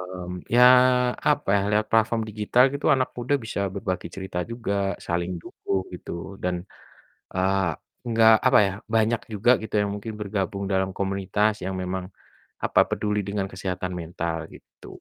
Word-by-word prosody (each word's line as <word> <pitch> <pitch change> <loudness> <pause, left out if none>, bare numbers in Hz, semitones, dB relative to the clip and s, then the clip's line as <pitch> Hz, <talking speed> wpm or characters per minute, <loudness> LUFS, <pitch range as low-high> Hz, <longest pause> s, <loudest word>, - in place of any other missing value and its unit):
Mmm, 90 -1 -7
ya 120 - +6 0.7
apa 145 -5 0
ya, - - +2
lewat 105 +1 +2
platform 115 +1 +3
digital 110 +4 +3
gitu 140 - -3
anak 130 -1 0
muda 125 +3 0
bisa 110 - -3
berbagi 95 -2 -3
cerita 95 -2 -5
juga, 115 -4 -3 0.3
saling 85 +1 -1
dukung 95 -1 -3
gitu - - -8 0.3
dan, 90 0 0 0.8
eee, 95 0 +2 0.4
nggak 115 -1 +6
apa - - +6
ya, - - -2 0.2
banyak 115 +1 +2
juga 105 +4 +3
gitu 110 - -8
yang 100 - -2
mungkin 110 +2 -6
bergabung 100 -1 -2
dalam 95 0 +1
komunitas 100 +2 0
yang 95 0 -3
memang, 90 0 -3 0.6
apa, - - +3
peduli 105 0 -1
dengan 100 -1 -2
kesehatan 90 -1 -4
mental 85 0 -3 0.2
gitu, - - -16
100 Hz, 150 wpm, -25 LUFS, 95-110 Hz, 0.8 s, ya